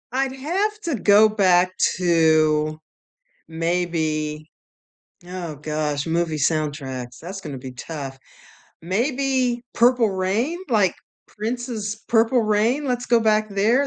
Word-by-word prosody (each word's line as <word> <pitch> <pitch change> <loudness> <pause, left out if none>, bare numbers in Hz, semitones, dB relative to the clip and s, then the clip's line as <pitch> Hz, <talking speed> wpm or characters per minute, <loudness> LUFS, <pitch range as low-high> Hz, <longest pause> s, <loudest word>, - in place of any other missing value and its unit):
I'd 265 +1 -1
have 385 +10 -1
to 335 -7 -2
go 210 0 +5
back 185 -4 +3 0.3
to 155 -3 +2 0.7
maybe 160 -2 -2 0.8
oh 175 -4 -6
gosh, 150 0 -2
movie 165 -1 0
soundtracks, 140 -5 -2
that's 190 +4 -7
gonna 145 -7 -7
be 130 0 -8
tough 135 0 -7 0.6
maybe 250 - 0
Purple 240 -2 +3
Rain, 200 - -1
like, 210 -7 +2 0.3
Prince's 220 -1 -4
Purple 230 +1 +3
Rain? 220 +7 +1
Let's 250 -2 -2
go 235 0 +4
back 215 -1 +2
there. 220 +7 +2
190 Hz, 115 wpm, -22 LUFS, 155-240 Hz, 0.8 s, go